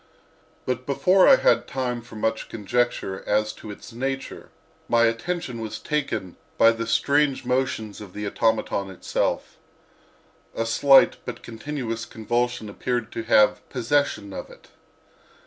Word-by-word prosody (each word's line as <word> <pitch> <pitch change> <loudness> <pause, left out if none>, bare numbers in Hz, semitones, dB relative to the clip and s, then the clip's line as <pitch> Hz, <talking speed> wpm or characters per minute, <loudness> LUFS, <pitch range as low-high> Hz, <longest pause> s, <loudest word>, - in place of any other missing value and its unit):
But 130 0 -3
before 180 +7 +4
I - - +9
had - - +2
time 125 -2 -2
for 115 -1 -14
much 110 +1 -2
conjecture 110 -2 -1
as 105 +1 +1
to 110 - -11
its 105 +4 -10
nature 135 +2 -4 0.4
my 115 0 +4
attention 115 +2 -1
was 110 -1 -5
taken 140 - -3 0.2
by 115 - +7
the 115 0 -4
strange 140 +2 +2
motions 125 -5 -1
of 100 -4 -10
the 105 0 -5
automaton 105 -2 0
itself. 95 - -2 1.0
A 115 - -1
slight 135 +4 +5
but - - -7
continuous 115 -1 -5
convulsion 120 +1 -2
appeared 120 +2 -3
to - - -4
have 105 -2 +4
possession 125 -5 0
of - - -7
it. - - -17
115 Hz, 135 wpm, -24 LUFS, 110-130 Hz, 1.0 s, I